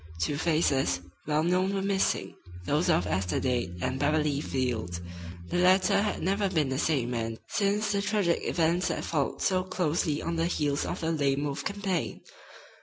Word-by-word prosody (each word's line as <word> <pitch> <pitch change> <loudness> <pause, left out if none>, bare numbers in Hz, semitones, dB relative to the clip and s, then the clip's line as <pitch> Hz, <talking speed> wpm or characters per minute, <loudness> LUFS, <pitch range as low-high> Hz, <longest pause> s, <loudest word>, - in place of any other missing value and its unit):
Two 145 - 0
faces, 150 - +1 0.3
well 150 0 +2
known, 185 +3 +1
were 195 - 0
missing, 190 - 0 0.3
those 150 - +1
of 90 - +3
Esther 90 0 0
Dade 120 -9 -1
and 130 +1 -1
Beverly 150 0 +1
Field. 115 - -2 0.5
The - - +1
latter 190 +2 +4
had 210 - -2
never 195 +2 +1
been 155 -7 +1
the 130 0 -1
same 135 -7 +1
man 115 -2 -2
since 210 +1 +1
the 200 -1 +1
tragic 200 -5 +1
events 170 +2 +1
that - - -2
followed 145 -4 -1
so 185 -1 +2
closely 170 -4 0
on 170 0 -3
the 165 +1 +1
heels 145 -4 0
of - - -4
the 165 0 0
Lame 140 -3 +1
Wolf 145 -1 -3
campaign. 200 -5 -2
155 Hz, 175 wpm, -28 LUFS, 135-185 Hz, 0.5 s, latter